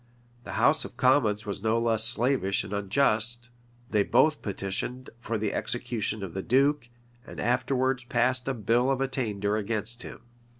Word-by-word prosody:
The - - -6
house - - +3
of - - -10
commons 115 -5 +2
were 100 - -2
no 110 +1 +1
less 115 -2 +2
slavish 120 -4 +1
and 100 - -7
unjust: 110 +3 0 0.4
they 105 - +3
both 155 +9 +3
petitioned 100 +6 -4
for 115 -1 -3
the 105 -1 -2
execution 110 -3 -2
of 90 -4 -6
the 95 - -3
duke, 135 +2 +2 0.4
and - - -9
afterwards 130 +1 0
passed 125 +1 +1
a 135 - -1
bill 120 +4 +1
of 135 -1 +1
attainder 110 -6 -1
against 110 +3 -4
him. - - -10
120 Hz, 160 wpm, -27 LUFS, 105-130 Hz, 0.4 s, house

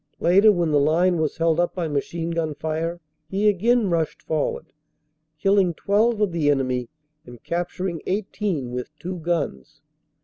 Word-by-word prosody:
Later, 195 +5 +6
when 175 -5 0
the 145 - +4
line 170 +4 +3
was 155 -2 -1
held 165 0 +2
up 175 - 0
by 175 -3 -1
machine 165 +3 -2
gun 160 -3 -2
fire, 160 +3 -3 0.3
he 200 +2 +1
again 220 +3 +3
rushed 165 -2 -1
forward, 155 -2 -2 0.6
killing 195 -1 +2
12 215 +4 +1
of 205 -3 +2
the 160 -3 +1
enemy 130 -4 0 0.3
and 120 -1 -13
capturing 175 0 -3
18 190 - -2
with 125 0 -4
two 180 +2 -5
guns. 155 - -3
170 Hz, 150 wpm, -23 LUFS, 155-190 Hz, 0.6 s, Later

